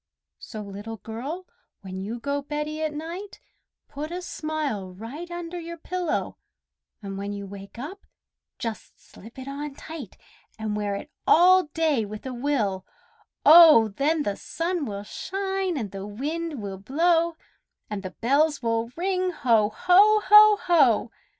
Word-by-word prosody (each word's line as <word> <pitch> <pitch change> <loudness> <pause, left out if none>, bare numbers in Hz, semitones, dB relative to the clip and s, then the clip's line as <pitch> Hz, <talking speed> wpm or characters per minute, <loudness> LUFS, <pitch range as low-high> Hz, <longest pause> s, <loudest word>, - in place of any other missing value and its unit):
So, 215 -2 -8
Little 205 +3 -7
Girl, 270 - -6 0.4
when 190 -1 -7
you 225 +4 -4
go 285 +3 -2
beddy 300 +2 -4
at 310 -1 0
night, 335 +7 -7 0.5
Put 295 +2 -6
a 360 +1 -5
smile 295 - -4
right 270 - -8
under 345 0 -6
your 340 0 -7
pillow, 350 0 -3 0.7
And 195 -1 -5
when 200 +1 -4
you 200 0 -6
wake 195 +1 -11
up, 310 +11 -8 0.5
just 225 -2 -6
slip 225 +6 -15
it 260 0 -8
on 280 +1 -5
tight, 305 - -9 0.4
And 215 -1 -3
wear 205 -1 -1
it 290 +9 -8 0.2
all 365 +2 +6
day 305 -5 0
with 210 +2 -8
a 260 - -4
will, 240 -8 -1 0.6
oh! 310 -9 +9
Then 295 +9 0
the 205 -5 -2
sun 335 -1 -3
will 200 -1 -5
shine 385 - -3
and 215 -7 -4
the 195 0 -6
wind 295 +4 -4
will 195 -1 -6
blow, 330 - +2 0.5
And 210 -2 -4
the 185 - -5
bells 285 +9 +1
will 230 0 0
ring, 370 +1 0
"Ho! 235 -10 +2
ho! 410 - +5
ho! 420 0 +8
ho!" 270 - +4
285 Hz, 150 wpm, -25 LUFS, 215-335 Hz, 0.7 s, oh